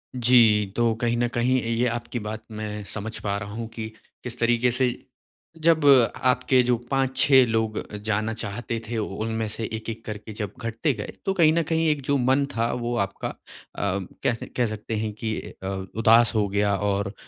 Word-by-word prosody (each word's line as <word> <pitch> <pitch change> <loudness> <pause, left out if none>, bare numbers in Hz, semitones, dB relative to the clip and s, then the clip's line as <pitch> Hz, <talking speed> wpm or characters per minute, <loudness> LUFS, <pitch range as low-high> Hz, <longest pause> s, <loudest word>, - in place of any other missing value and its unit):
जी, 115 -4 +5
तो 120 -1 +2
कहीं 120 0 +1
न 120 0 +2
कहीं 125 +2 +2
ये 115 - -4
ये 115 +2 +1
आपकी 120 +1 -3
बात 110 +1 -6
मैं 105 -1 -5
समझ 110 +1 -4
पा 100 -1 -1
रहा 100 0 -6
हूँ 115 +1 -4
कि 110 -1 -5 0.4
किस 125 -1 -6
तरीके 120 +1 +3
से, 125 +1 +2 0.7
जब 160 -1 +3 0.3
आपके 125 0 +3
जो 125 0 +2 0.2
5-6 135 0 +4
लोग 110 -2 -1 0.2
जाना 110 +1 0
चाहते 115 +2 -4
थे, 120 - -2
उनमें 110 +1 -2
से 110 +2 -4
एक-एक 110 0 -5
करके 110 +1 -7
जब 105 -2 -4
घटते 115 +5 -1
गए - - -6
तो 195 - +1
कहीं 165 -4 +4
न 170 0 +2
कहीं 160 0 +2
एक 150 -2 0
जो 140 +1 +2
मन 130 +2 +2
था 115 0 +1
वो 120 0 -2
आपका 100 - -6 0.5
अम, 100 -2 -2 0.2
कैसे 115 -2 0
कह 125 - +3
सकते 110 0 -4
हैं 110 0 -2
कि 110 +1 -3 0.3
अ, - - -3 0.3
उदास 115 +1 +5
हो 105 -2 +2
गया 100 0 +1
और 100 0 -1
115 Hz, 190 wpm, -25 LUFS, 110-125 Hz, 0.7 s, जी